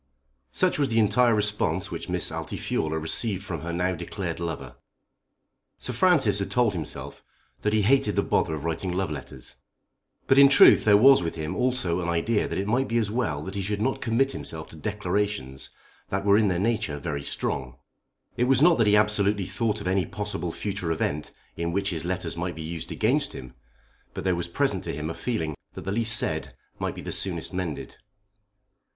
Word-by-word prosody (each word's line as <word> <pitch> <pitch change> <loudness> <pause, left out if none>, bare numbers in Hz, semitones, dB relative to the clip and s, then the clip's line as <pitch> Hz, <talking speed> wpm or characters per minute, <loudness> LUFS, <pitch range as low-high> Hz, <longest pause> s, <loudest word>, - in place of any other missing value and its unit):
Such 65 - +1
was 140 -2 +2
the 115 - 0
entire 115 +2 +4
response 105 0 0
which - - -5
Miss - - 0
Altifiorla 80 0 -2
received 95 +5 +1
from 90 -5 -5
her 85 +1 -4
now 90 +2 0
declared 85 - -5
lover. 70 -7 -5 1.0
Sir 125 - -3
Francis 130 - +3
had 100 - -2
told 120 -4 +2
himself 80 -5 -6 0.4
that 105 - +1
he 110 -1 +2
hated 135 +6 +3
the - - +2
bother 80 - +1
of 75 +1 -6
writing 85 +3 -2
love 90 -3 -1
letters. 65 -3 -9 0.7
But 135 - +5
in 140 0 +9
truth 140 - +7
there 105 -1 +7
was 135 +5 +7
with 85 -1 -3
him 80 -1 -4
also 125 -9 0
an 85 - -2
idea 95 +6 +1
that - - -4
it 95 - -1
might 125 +5 +1
be 115 - 0
as 110 -3 0
well 90 - -1
that 95 - -6
he 100 - -2
should 100 +2 -2
not 130 +5 -1
commit 125 +4 +1
himself 80 -9 -6
to - - -11
declarations 100 -6 -3 0.4
that 95 +1 -2
were 100 0 +5
in 105 0 +4
their 90 -3 +1
nature 100 -7 0
very 70 0 -4
strong. 65 -2 -3 0.6
It 125 - +2
was 130 0 +4
not 170 -6 +5
that 115 - +4
he 105 - +5
absolutely 105 -2 +2
thought 110 +1 -2
of 105 - -5
any 95 -2 +1
possible 105 -5 -4
future 95 -2 -3
event 75 -2 -2 0.3
in 85 +1 -2
which 100 +2 -1
his 80 -2 -3
letters 90 -2 -3
might 85 +1 -3
be 80 - -6
used 80 0 -6
against 140 +6 +1
him, 65 -1 -9 0.6
but - - -4
there 95 - +2
was 85 0 -2
present 85 - 0
to - - -3
him 75 +2 -4
a - - -4
feeling 95 -11 -2 0.2
that - - -7
the 95 - -4
least 110 +1 +2
said 125 0 -3 0.2
might - - -2
be - - -7
the - - -6
soonest - - -1
mended. 90 -5 -4
100 Hz, 200 wpm, -26 LUFS, 85-110 Hz, 1.0 s, in